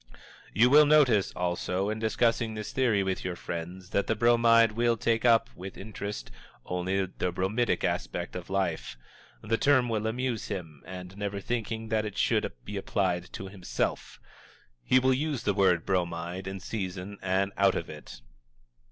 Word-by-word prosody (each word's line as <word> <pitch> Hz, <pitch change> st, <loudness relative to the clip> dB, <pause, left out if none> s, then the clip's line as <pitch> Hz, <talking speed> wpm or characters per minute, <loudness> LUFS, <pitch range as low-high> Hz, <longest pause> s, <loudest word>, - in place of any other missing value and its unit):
You 120 Hz, +5 st, +4 dB
will 150 Hz, +1 st, +8 dB
notice, 135 Hz, -10 st, +4 dB
also, 90 Hz, +3 st, -1 dB
in 110 Hz, -, -3 dB
discussing 115 Hz, 0 st, +1 dB
this 105 Hz, -1 st, -5 dB
theory 115 Hz, -7 st, +2 dB
with 95 Hz, -1 st, -2 dB
your 90 Hz, -1 st, -3 dB
friends, 90 Hz, +3 st, -6 dB
that 100 Hz, -, +1 dB
the 110 Hz, -, +1 dB
Bromide 115 Hz, 0 st, +5 dB
will 120 Hz, +1 st, +1 dB
take 115 Hz, +1 st, +1 dB
up, 115 Hz, 0 st, +4 dB
with 95 Hz, +2 st, -8 dB
interest, 100 Hz, -, -6 dB, 0.3 s
only 95 Hz, +2 st, -1 dB
the 90 Hz, -1 st, -3 dB
bromidic 105 Hz, +7 st, 0 dB
aspect -, -, -2 dB
of -, -, -6 dB
life. 95 Hz, -9 st, -2 dB, 0.5 s
The 115 Hz, +1 st, 0 dB
term 130 Hz, -4 st, +4 dB
will 110 Hz, -1 st, -1 dB
amuse 120 Hz, 0 st, -2 dB
him, 80 Hz, -6 st, -6 dB
and, 90 Hz, 0 st, -8 dB
never 100 Hz, -1 st, -3 dB
thinking 110 Hz, 0 st, -3 dB
that 110 Hz, -1 st, +1 dB
it 105 Hz, -2 st, -6 dB
should -, -, +1 dB
be 105 Hz, 0 st, -5 dB
applied 90 Hz, -3 st, -1 dB
to 95 Hz, -, -6 dB
himself, 95 Hz, -2 st, -3 dB, 0.6 s
he 130 Hz, -, +4 dB
will 130 Hz, +1 st, +4 dB
use 140 Hz, -2 st, -1 dB
the 100 Hz, -, +1 dB
word 95 Hz, -4 st, +3 dB
"Bromide" 90 Hz, 0 st, -2 dB
in 95 Hz, 0 st, -5 dB
season 100 Hz, -1 st, -5 dB
and 95 Hz, +1 st, +1 dB
out 100 Hz, -1 st, +3 dB
of -, -, -3 dB
it. -, -, -10 dB
100 Hz, 165 wpm, -28 LUFS, 95-115 Hz, 0.6 s, will